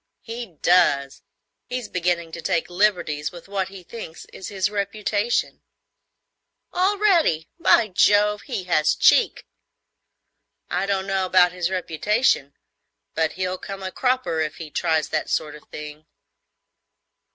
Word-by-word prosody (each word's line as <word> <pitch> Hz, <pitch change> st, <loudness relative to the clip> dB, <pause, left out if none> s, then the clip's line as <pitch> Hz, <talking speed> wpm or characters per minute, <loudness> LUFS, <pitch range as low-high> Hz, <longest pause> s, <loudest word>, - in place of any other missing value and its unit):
"He 230 Hz, -7 st, -7 dB
does. 140 Hz, -6 st, +3 dB, 0.5 s
He's 250 Hz, -3 st, -4 dB
beginning 175 Hz, -2 st, -1 dB
to 170 Hz, -, -7 dB
take 180 Hz, -1 st, -1 dB
liberties 175 Hz, -6 st, +1 dB
with 175 Hz, +1 st, -12 dB
what 195 Hz, -2 st, -2 dB
he 190 Hz, -1 st, -11 dB
thinks 175 Hz, -5 st, -9 dB
is 190 Hz, -, -8 dB
his 200 Hz, 0 st, -1 dB
reputation." 210 Hz, +2 st, -1 dB, 1.1 s
"Already! 365 Hz, -, +2 dB
By 235 Hz, -9 st, +4 dB
Jove, 210 Hz, +2 st, +3 dB
he 190 Hz, -, -4 dB
has 155 Hz, -4 st, +2 dB
cheek! -, -, +4 dB, 1.3 s
I 180 Hz, +4 st, 0 dB
don't 195 Hz, -1 st, 0 dB
know 195 Hz, -1 st, 0 dB
about 180 Hz, -1 st, +5 dB
his 180 Hz, -1 st, -2 dB
reputation, 185 Hz, -, 0 dB, 0.6 s
but 160 Hz, -1 st, 0 dB
he'll 185 Hz, 0 st, -3 dB
come 195 Hz, -1 st, -7 dB
a 190 Hz, -, -4 dB
cropper 250 Hz, -11 st, 0 dB
if 155 Hz, -1 st, -1 dB
he 160 Hz, -2 st, -9 dB
tries 160 Hz, -2 st, 0 dB
that -, -, -2 dB
sort 150 Hz, -1 st, -1 dB
of 150 Hz, -, -14 dB
thing." 150 Hz, +1 st, -9 dB
185 Hz, 130 wpm, -23 LUFS, 165-210 Hz, 1.3 s, about